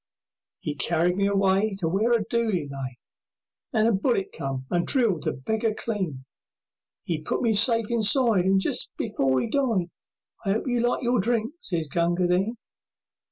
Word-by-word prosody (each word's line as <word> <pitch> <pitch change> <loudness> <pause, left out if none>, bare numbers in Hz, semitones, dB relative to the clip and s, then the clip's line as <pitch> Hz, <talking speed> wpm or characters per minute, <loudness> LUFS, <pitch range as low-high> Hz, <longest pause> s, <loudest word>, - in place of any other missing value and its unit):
'E 150 - -2
carried 170 +5 +1
me 200 +1 +1
away 195 +1 +2
To 175 -4 -1
where 200 +8 +1
a 230 -3 +2
dooli 215 -10 0
lay, 135 -2 -6 0.7
And 220 0 +2
a - - +4
bullet 200 0 0
came 135 -1 -5
and 175 -1 +1
drilled 225 - +2
the - - +1
beggar 220 - -2
clean. 185 - -3 0.8
'E 165 -3 -2
put 155 - -2
me 230 -2 +3
safe 230 +1 +3
inside, 230 -3 +3
And 195 0 +4
just - - -2
before 135 - 0
'e - - -1
died, 220 -9 0 0.5
"I 195 +1 +1
'ope 220 - -2
you 245 -1 +1
liked 240 +2 0
your 245 0 +2
drink," 230 +4 0
sez 170 - -2
Gunga 175 +4 +1
Din. 190 +7 +1
195 Hz, 165 wpm, -25 LUFS, 170-230 Hz, 0.8 s, a